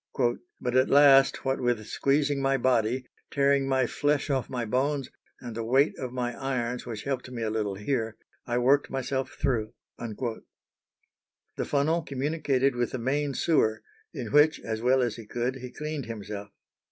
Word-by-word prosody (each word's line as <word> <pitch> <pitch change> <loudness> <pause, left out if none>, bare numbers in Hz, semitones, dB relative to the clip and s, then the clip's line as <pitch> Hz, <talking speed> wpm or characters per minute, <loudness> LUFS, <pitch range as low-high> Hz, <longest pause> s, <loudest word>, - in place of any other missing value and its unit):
"But 125 0 -2
at 130 0 +4
last, 135 -2 +6
what 135 0 0
with 120 -3 0
squeezing 140 +3 +1
my 135 0 +2
body, 125 0 +1 0.2
tearing 140 -1 +2
my 130 -1 +2
flesh 145 +3 0
off 135 -2 -1
my 120 -2 -2
bones, 135 +4 -1 0.3
and 120 -3 -7
the 115 - -3
weight 135 +6 +3
of 130 -2 -4
my 125 -1 -2
irons, 125 -2 -2
which 110 -3 -5
helped 130 -2 -3
me 120 -2 -5
a 110 - -1
little 105 -3 -1
here, 115 +1 -2 0.3
I 120 0 0
worked 135 +4 +3
myself 135 0 -3
through." 110 -5 0 0.3
The 115 0 -4 1.2
funnel 155 +4 +1
communicated 140 -2 0
with 120 -1 -1
the - - -1
main 140 +3 -1
sewer, 110 -10 +2 0.3
in - - -6
which, 150 +2 +5
as 110 -1 -4
well 130 +2 +3
as 120 -2 -2
he 115 -2 -10
could, 120 +4 -2
he 125 -1 -7
cleaned 150 -2 -5
himself. 105 -2 -6
130 Hz, 165 wpm, -27 LUFS, 120-140 Hz, 1.2 s, last